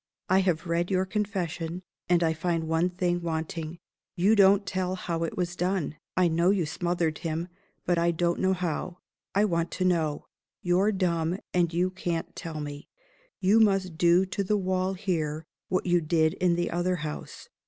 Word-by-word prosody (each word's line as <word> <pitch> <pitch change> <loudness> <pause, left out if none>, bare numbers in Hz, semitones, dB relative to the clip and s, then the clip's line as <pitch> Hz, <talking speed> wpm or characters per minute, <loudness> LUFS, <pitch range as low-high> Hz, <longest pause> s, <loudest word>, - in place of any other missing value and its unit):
I 190 +1 +5
have 180 -3 0
read 170 +1 0
your 190 -1 +1
Confession; 185 -4 -3 0.3
and 175 -1 +4
I 160 -1 +2
find 165 0 -1
one 165 +2 +2
thing 175 -1 -1
wanting. 160 0 -4 0.4
You 195 +5 +4
don't 200 0 +5
tell 185 0 -1
how 170 -2 -3
it 165 - -4
was 175 -1 -1
done. 180 -3 -1 0.2
I 185 -1 +5
know 170 +2 +2
you 195 -4 +2
smothered 165 0 -1
him 165 +2 -3 0.4
but 175 -1 +2
I 170 0 +3
don't 170 +1 0
know 190 0 +2
how. 180 0 -3 0.4
I 205 +2 +4
want 170 -3 0
to 185 - -1
know. 160 -5 +1 0.4
You're 185 +4 +3
dumb; 175 -3 0 0.2
and 175 -2 +2
you 180 +2 +1
can't 175 -3 -3
tell 160 -2 -6
me. 145 -1 -6 0.5
You 200 +4 +5
must 195 -5 +2
do 175 +2 +5
to 200 +1 -2
the 210 +2 +1
wall 185 0 0
here 160 -5 -2 0.2
what 185 - 0
you 175 -1 +3
did 160 0 +2
in 180 -2 +1
the 175 0 -1
other 175 +2 0
house. 150 - -7
175 Hz, 180 wpm, -27 LUFS, 165-185 Hz, 0.5 s, I